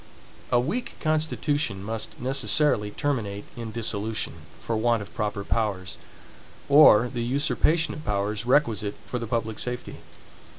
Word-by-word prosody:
A 120 - +5
weak 205 - -2
constitution 150 - 0
must 110 +1 -5
necessarily 135 -3 +1
terminate 105 -5 -2
in 115 -2 -6
dissolution, 110 -1 -1 0.3
for 115 - -2
want 115 -1 +1
of - - -14
proper 105 -2 -2
powers, 100 -5 -2 0.7
or 140 -6 +7
the 120 -1 -4
usurpation 150 +6 +1
of 155 - -8
powers 105 0 -1
requisite 115 -6 +1
for 125 - -3
the 115 - -5
public 110 -1 -2
safety. 125 0 -5
115 Hz, 130 wpm, -26 LUFS, 105-140 Hz, 0.7 s, or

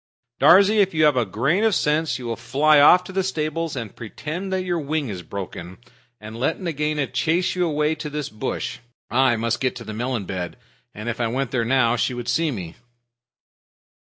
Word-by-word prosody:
Darzee, 200 +8 +6
if 195 -4 +2
you 155 - +3
have 150 -2 +4
a 120 -4 +1
grain 140 - +1
of 220 -4 +3
sense 150 -3 +1
you 125 - -8
will 115 -1 -2
fly 140 +6 +3
off 180 +5 +7
to 185 - -9
the 190 +1 0
stables 165 -3 -2
and 115 -6 -6
pretend 155 - -6
that 190 -1 0
your 175 -2 -1
wing 150 -2 -2
is 95 -4 -5
broken, 90 0 -7 0.4
and 110 +2 -9
let 140 +6 0
Nagaina 150 -4 -1
chase 170 +6 0
you 180 -1 0
away 150 0 +1
to 150 -1 -6
this 150 -1 -4
bush. 110 +5 -4 0.3
I 130 -1 +3
must 115 0 -1
get 130 -1 0
to 120 - -8
the 110 - -7
melon 120 -1 -2
bed, 90 -2 -5 0.4
and 105 +2 -7
if 120 0 -3
I 115 - +1
went 130 +2 -2
there 120 -3 0
now 120 -1 +2
she'd 120 +1 -2
see 160 +6 +1
me." 90 - -6
135 Hz, 200 wpm, -22 LUFS, 115-160 Hz, 0.4 s, off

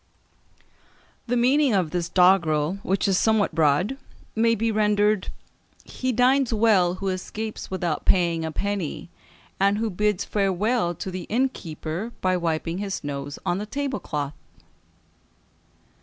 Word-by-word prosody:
The 245 +1 +1
meaning 260 0 +3
of 180 -5 0
this 175 -1 -2
doggrel, 180 -2 +3
which 195 0 0
is 190 -2 +2
somewhat 220 -2 +2
broad, 165 - +2 0.4
may 230 +1 +3
be 225 +1 0
rendered 210 -1 +2 0.6
"He 255 0 -3
dines 255 +2 +3
well 210 -6 +3
who 195 +1 -3
escapes 210 +4 -5
without 175 -4 -2
paying 170 -3 +2
a 160 - -3
penny, 190 -2 -3 0.5
and 200 +1 +3
who 220 0 -1
bids 210 +1 0
farewell 195 -1 0
to 190 - -5
the 185 -1 -5
innkeeper 210 -5 -3
by 185 0 +1
wiping 165 0 -2
his 195 -4 -4
nose 140 0 -5
on 175 - 0
the 210 - -5
tablecloth." 260 - -3
195 Hz, 130 wpm, -24 LUFS, 175-220 Hz, 0.6 s, meaning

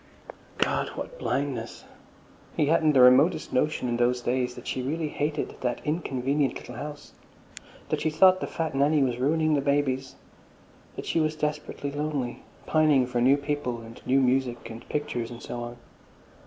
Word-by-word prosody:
God, - - +1
what - - -7
blindness! 130 -5 -3 0.7
He 150 - +3
hadn't 155 0 +3
the 130 - +6
remotest 130 +7 +5
notion 140 -1 +1
in 120 -1 0
those 120 +1 +2
days 125 0 -1
that - - -10
she 130 - -2
really 155 +4 -2
hated 150 +1 -2
that 125 -1 -1
inconvenient 140 -3 0
little - - -8
house, 145 0 -8 0.8
that - - -1
she 155 - +1
thought 185 +4 +5
the - - -2
fat 160 -3 -3
Nanny 145 +2 +3
was 125 -2 -1
ruining 155 +4 +2
the 145 - +2
babies, 135 -2 0 0.8
that - - -6
she - - 0
was 155 0 +1
desperately 150 -2 -3
lonely, 145 -4 -3 0.2
pining 155 -5 +4
for 125 -1 -1
new 135 +3 +5
people 140 -5 -3
and 115 0 -12
new 135 +2 +4
music 125 -2 0
and 115 +1 -11
pictures 145 -6 -2
and 120 -1 -10
so 120 - -5
on. 120 0 -7
140 Hz, 170 wpm, -27 LUFS, 125-150 Hz, 0.8 s, the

